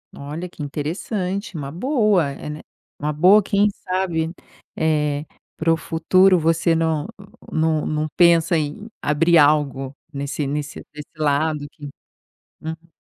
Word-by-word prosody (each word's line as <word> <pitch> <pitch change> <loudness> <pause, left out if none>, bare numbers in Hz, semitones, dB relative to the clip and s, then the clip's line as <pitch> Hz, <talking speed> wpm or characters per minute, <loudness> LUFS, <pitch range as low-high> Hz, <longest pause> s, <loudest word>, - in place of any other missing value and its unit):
Olha, 150 +6 -6
que 165 - -12
interessante. 180 +7 -3
Uma 140 -1 -5
boa, 210 - +2
é 140 - -8
né. 150 +1 -6 0.4
Uma 150 +1 -1
boa 185 +8 +6
quem 205 +1 +2
sabe. 180 -4 -2 0.4
Eh, 150 -2 0 0.3
para 165 +1 +2
o - - 0
futuro 180 +4 +3
você 165 +1 +2
não 160 -2 0 0.4
não 160 -1 +1
não 155 0 -1
pensa 170 -1 +5
em 155 +8 -4
abrir 165 +3 +3
algo 145 -3 +2 0.2
nesse 140 +1 -3
nesse 145 +1 -4
desse 150 0 -10
lado 150 0 0
que 145 -1 -9 0.7
Uhum. 160 +1 -7
160 Hz, 135 wpm, -21 LUFS, 150-175 Hz, 0.7 s, boa